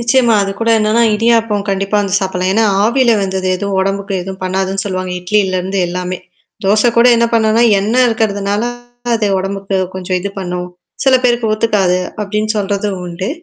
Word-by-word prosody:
நிச்சயமா. 235 0 +3
அது 195 - -2
கூட 230 - 0
என்னன்னா 215 +2 +2
இடியாப்பம் 225 -2 +1
கண்டிப்பா 195 +1 0
வந்து 200 -2 -2
சாப்பிடலாம். 185 -1 -1
ஏன்னா 225 +3 +2 0.2
ஆவியில 235 0 +3
வெந்தது 190 -1 -2
எதுவும் 200 0 -2
உடம்புக்கு 195 +1 -2
எதுவும் 190 +1 -8
பண்ணாதுன்னு 190 +1 -2
சொல்லுவாங்க. 185 -2 -3
இட்லிலருந்து 190 0 0
எல்லாமே. 180 +1 -4 0.5
தோசை 210 +4 +3
கூட 235 +1 +6
என்ன 235 0 +3
பண்ணுனா, 220 0 +3 0.2
எண்ணெய் 230 +6 +2
இருக்கிறதுனால 205 -2 -1 0.5
அது 225 -2 0
உடம்புக்கு 195 +1 -3 0.2
கொஞ்சம் 185 0 -2
இது 200 - -3
பண்ணும். 180 -1 -4 0.4
சில 265 -1 +5
பேருக்கு 240 -2 +1
ஒத்துக்காது 210 -5 +1 0.2
அப்படின்னு 210 +1 -2
சொல்றதும் 200 -1 -2
உண்டு. 175 +3 -4
200 Hz, 155 wpm, -15 LUFS, 190-220 Hz, 0.5 s, கூட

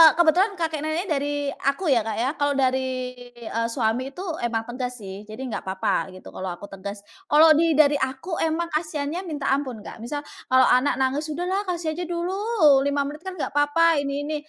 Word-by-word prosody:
kebetulan 360 +5 +4
kakek 320 -3 -2
nenek 315 +5 -1
dari 285 0 -1 0.2
aku 295 +2 +1
ya, 240 - +5
Kak, 220 -1 -3
ya. 240 +4 0
Kalau 285 -1 +1
dari, 260 -1 0 0.2
eee, 230 -1 -2
suami 240 +3 -1
itu 370 - -6 0.2
emang 230 -1 -1
tegas 250 -1 -4
sih 195 +2 -7
jadi 220 +5 -7
enggak 230 - -4
apa-apa 190 0 -1
gitu, 185 - -11
kalau 190 - -5
aku 200 - -10
tegas, 200 +1 -7 0.2
kalau 310 +2 +7
di 330 -2 +3
dari 290 -1 +5
aku 265 +7 -3
emang 325 +1 0
kasiannya 305 0 -2
minta 290 -4 -2
ampun, 260 -6 -1
Kak, - - -9
misal 290 +6 -4 0.2
kalau 260 0 +5
anak 255 +3 +3
nangis, 270 +4 0
"Udahlah 365 +6 -2
kasih 340 -3 -2
aja 340 +3 -4
dulu 345 +1 -2 0.6
5 285 0 +1
menit 290 +2 -6
kan 375 -1 -6
nggak 310 - -3
papa, 295 +2 +4
ini 280 0 -2
ini," 305 +1 -3
285 Hz, 195 wpm, -24 LUFS, 250-320 Hz, 0.6 s, kalau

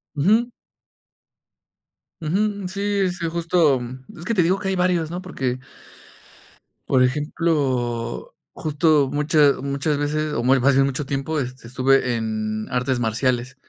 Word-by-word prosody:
Ujú. 215 +11 +3 1.7
Ujú. 200 +4 -1
Sí, 200 0 0
sí, 175 -1 -4
justo, 165 -4 +2
mm, 125 +2 -8 0.2
es 170 - -9
que 230 - 0
te 185 -5 +3
digo 185 +4 +2
que 190 - -4
hay 195 - 0
varios, 180 -3 +1
¿no? 175 +2 -5
Porque 130 -9 -3 1.3
por 130 -2 +4
ejemplo, 130 -4 -1 0.2
justo 150 -2 +2
mucha 150 0 +4
muchas 140 +2 -1
veces 150 +1 -1
o 115 - -1
muy 130 +2 +4
fácil, 135 +1 +4
mucho 140 +1 -2
tiempo, 140 +3 -2
este, 125 -2 -6
estuve 130 0 +2
en 110 -1 -3
artes 125 0 0
marciales 120 +3 0
145 Hz, 135 wpm, -22 LUFS, 130-170 Hz, 1.7 s, por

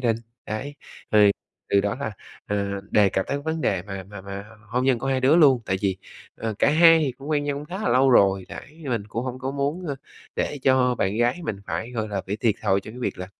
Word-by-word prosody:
đình. 115 -3 +1 0.3
Đấy, 140 +7 -4 0.4
thì 105 -1 +7 0.4
từ 100 - +5
đó 105 +4 -1
là, 110 -7 -3 0.3
ờ, 100 -1 -2
đề 105 -2 +5
cập 95 0 -1
tới 140 - -1
vấn 160 +1 -2
đề 95 -9 0
mà 95 -1 -6
mà 100 0 -10
mà 100 +1 -7
h 110 +1 -17
hôn 125 +1 +2
nhân 130 -3 +3
của 135 - -4
hai 130 -1 +1
đứa 135 +5 +5
luôn. 140 -7 +6
Tại 95 - +1
vì, 95 -2 +1 0.4
ờ, 110 -2 -3
cả - - +4
hai 165 +1 +7
thì 140 -5 0
cũng 140 +4 -9
quen 145 -1 +1
nhau 145 -1 -1
cũng 145 - -6
khá 180 +5 -6
là - - 0
lâu 130 +2 +4
rồi, 95 -4 +4
đấy, 155 +3 -11
mình 115 -4 0
cũng 115 +3 -3
hông 130 0 -4
có 130 +1 -3
muốn, 145 +6 -2
ơ, 145 - -2 0.4
để 145 - -1
cho 130 -2 +3
bạn 100 -1 -1
gái 120 +8 +2
mình 105 - -2
phải, 85 +9 -3
gọi 110 -3 -3
là, 100 -2 -2
bị 100 - -2
thiệt 110 -1 +1
thòi 100 -2 +2
trong 110 +4 -10
cái - - -9
việc 120 - -2
là, 90 - -5
120 Hz, 260 wpm, -24 LUFS, 100-140 Hz, 0.4 s, thì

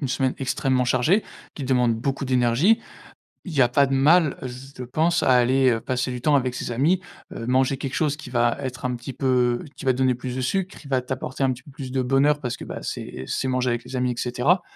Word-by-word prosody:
une 140 - -2
semaine 130 0 0
extrêmement 130 -1 0
chargée, 130 - +2 0.3
qui 145 - -7
te - - -6
demande 125 -3 +3
beaucoup 135 +3 -2
d'énergie, 130 - +3 0.6
il 180 - -7
y 135 - +5
a 120 - +4
pas 140 +3 +3
de 135 - -1
mal, 150 +3 +4
z 130 +3 -10
je 125 - -4
pense, 165 +7 +1
à - - +3
aller, 130 +1 +4
heu, 115 -1 0
passer 130 +1 -2
du 125 -1 -5
temps 145 +1 +3
avec 125 -2 0
ses 125 - -4
amis, 155 +10 +2 0.3
heu, 115 - -6
manger 130 +1 +2
quelque 135 -1 -4
chose 150 -2 0
qui 145 - -10
va 120 -1 +2
être 125 -1 -6
un 125 - 0
petit 120 +2 -7
peu 125 -3 +1
qui - - -9
va 130 - +5
te 125 - -6
donner 130 -1 +3
plus 125 +1 -5
de - - -2
sucre, 190 +8 -1
qui 145 - -13
va 130 -2 +1
t'apporter 130 +1 -3
un 130 - +2
petit 125 +1 -9
peu 145 - -15
plus 135 -2 -8
de 130 -1 +1
bonheur 140 +3 +2
parce 125 -2 -3
que, - - -9
bah, - - -7
c'est 65 - -6
c'est 130 - -2
manger 130 -1 +1
avec 120 0 -2
les 130 +1 -6
amis 125 0 +1
et - - -8
cetera. 130 +9 +1
130 Hz, 260 wpm, -24 LUFS, 125-140 Hz, 0.6 s, y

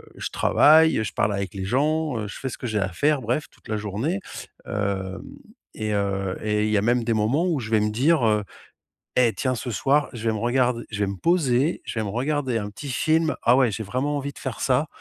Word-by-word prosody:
je - - -4
travaille. 160 -2 +5
Heu, - - 0
je - - -4
parle 100 0 +1
avec 100 0 -4
les 95 -1 -4
gens, 150 +3 0
heu, 105 - -4
je - - -8
fais 130 - -3
ce - - -7
que 125 - -4
j'ai 110 -2 -1
à 95 0 0
faire, 145 - +1
bref, 125 +7 -1
toute - - -21
la 110 - -1
journée. 110 - -2 0.5
Hem 95 -2 -3 0.6
et 110 -1 -2
heu 100 -2 -1
et 105 0 +1
il 110 - 0
y 105 - +3
a - - +2
même 120 +1 +2
des 115 - -1
moments 115 +11 +1
où 160 -6 0
je 110 -1 -6
vais 110 - +4
me 105 0 +1
dire, 135 +3 +3
heu: 105 -1 +2 0.8
«Eh, 115 -4 +4
tiens, 130 +6 -1
ce 120 +1 -4
soir, 140 +8 +2
je 115 -1 -2
vais - - +1
me - - -2
regard 125 +1 +2 0.2
je 100 - -4
vais 100 - +1
me 100 - -3
poser, 155 - +1
je - - -5
vais - - 0
me - - -3
regarder 130 +1 -1
un 105 0 -4
petit 140 +7 -8
film. 160 +4 +1
Ah, 120 - +5
ouais, 125 -5 +3
j'ai 110 - -4
vraiment 130 +8 -2
envie 140 0 -4
de - - -17
faire 130 -4 -5
ça. 135 +4 +2
120 Hz, 250 wpm, -24 LUFS, 105-140 Hz, 0.8 s, travaille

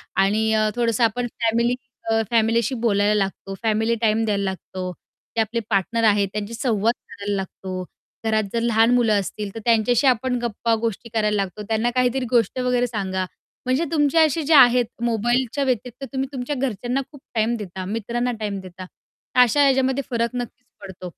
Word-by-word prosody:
आणि 215 +3 +2
अ, 215 0 +2
थोडंसं 235 -1 +1
आपण 240 +2 +1
फॅमिली 235 +2 +2 0.4
अ, 225 0 +3
फॅमिलीशी 230 +2 +2
बोलायला 210 -3 +2
लागतो, 195 -1 -2
फॅमिली 220 +1 +1
टाईम 220 0 +2
द्यायला 205 -2 0
लागतो, 185 -1 -4 0.4
ते 225 - +3
आपले 220 +2 -1
पार्टनर 225 +3 +1
आहेत 205 -2 +4
त्यांची 210 +2 -4
संवाद 230 -2 +1 0.2
करायला 205 -1 -4
लागतो, 185 -1 -5 0.4
घरात 220 -1 +2
जर 230 - 0
लहान 230 0 +3
मुलं 225 -4 +3
असतील 200 +2 -5
तर - - -4
त्यांच्याशी 235 +3 +3
आपण 255 0 +2
गप्पा 230 0 0
गोष्टी 230 0 -3
करायला 210 -1 +1
लागतो. 195 +1 -2
त्यांना 225 +2 +1
काहीतरी 250 +1 +1
गोष्ट 235 0 +2
वगैरे 250 -1 +1
सांगा 190 -5 -2 0.4
म्हणजे 260 +6 +1
तुमचे 295 0 +3
असे 315 +2 0
जे 310 +3 +2
आहेत 250 -4 +7 0.2
मोबाईलच्या 240 +4 0
व्यतिरिक्त 250 0 -2
तुम्ही 265 0 -1
तुमच्या 260 +3 -3
घरच्यांना 250 0 -1
खूप 285 - -14
टाईम 225 +2 +1
देता, 190 -3 -6
मित्रांना 235 +4 -2
टाईम 205 -2 -3
देता 185 0 -10 0.6
अशा 280 +4 +3
याच्यामध्ये 265 0 +2
फरक 235 -1 0
नक्कीच 245 +1 -10 0.2
पडतो. 190 -2 -8
230 Hz, 165 wpm, -22 LUFS, 210-245 Hz, 0.6 s, आहेत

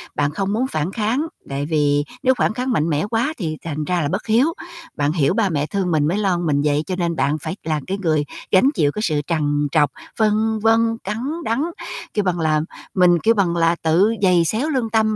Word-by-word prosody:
bạn 145 0 +1
không 195 +5 -2
muốn 255 +4 0
phản 155 - -2
kháng, 230 +8 0 0.2
tại 140 +1 -2
vì 145 -2 +2 0.2
nếu 260 - +4
phản 215 - +1
kháng 255 +2 -2
mạnh 165 -6 +1
mẽ 150 +3 0
quá 240 +8 0
thì 160 -6 -3
thành 155 -2 -3
ra 180 -1 0
là 145 - 0
bất 185 - -3
hiếu. 250 +9 +3 0.4
Bạn 145 0 +1
hiểu 155 -4 +2
ba 220 -4 +1
mẹ 150 -3 0
thương 185 +2 -2
mình 150 -2 +2
mới 180 +6 0
lo 195 -4 +1
mình 155 -5 0
vậy 150 0 +1
cho 185 - -2
nên 170 -2 -1
bạn 150 -1 +1
phải 180 - -4
là 155 -1 -1
cái 195 +1 -2
người 155 -6 0 0.3
gánh 195 +8 +5
chịu 145 -2 +2
cái 210 - -4
sự 155 -8 0
trằn 145 -3 0
trọc, 145 -3 +3 0.3
phân 220 0 +2
vân, 225 +1 +2
cắn 210 +3 -3 0.3
đắng, 230 +4 0 0.5
kêu 210 - +1
bằng 180 -2 0
là, 155 -1 +2 0.3
mình, 180 -2 +4
kêu 225 +7 +3
bằng 190 -6 +1
là, 165 0 +3
tự 175 +7 +3
giày 180 -3 +4
xéo 230 - -1
lương 255 -6 -1
tâm 220 -1 +2
180 Hz, 230 wpm, -20 LUFS, 155-220 Hz, 0.5 s, gánh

